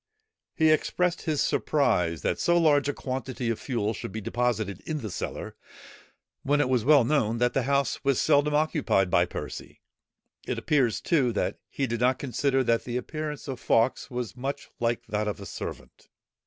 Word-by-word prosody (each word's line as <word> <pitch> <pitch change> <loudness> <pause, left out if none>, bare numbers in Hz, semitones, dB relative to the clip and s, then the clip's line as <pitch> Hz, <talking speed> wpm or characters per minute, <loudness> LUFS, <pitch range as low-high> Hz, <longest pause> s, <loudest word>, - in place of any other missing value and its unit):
He 160 -1 +4
expressed 180 +3 +1
his 155 -3 0
surprise 90 - +1
that - - 0
so 175 0 +3
large 145 -4 +4
a - - 0
quantity 130 -2 -3
of 115 - -3
fuel 115 -5 -1
should 95 - -6
be 110 - -4
deposited 110 -3 -1
in 155 -2 -2
the 110 -4 -5
cellar, - - -5 0.9
when 145 +2 +1
it 145 - +2
was 125 -4 +2
well 145 0 +6
known, 115 -4 +1
that 120 +1 +1
the 135 - +2
house 140 -2 +1
was 140 -2 +2
seldom 150 0 +3
occupied 150 - +1
by 85 - +4
Percy. - - -7 0.7
It - - -2
appears, 125 -10 +1
too, 135 -8 +2
that 105 - -1
he 140 - -1
did 120 -2 -3
not 125 +1 +3
consider 135 +1 0
that 115 -1 +1
the 125 0 -3
appearance 150 +3 -5
of 130 -3 -5
Fawkes 115 +4 +1
was 125 -5 -4
much 135 +3 -5
like 120 0 -1
that 105 0 -2
of 105 - -3
a 100 - -8
servant. - - -8
130 Hz, 180 wpm, -27 LUFS, 115-145 Hz, 0.9 s, well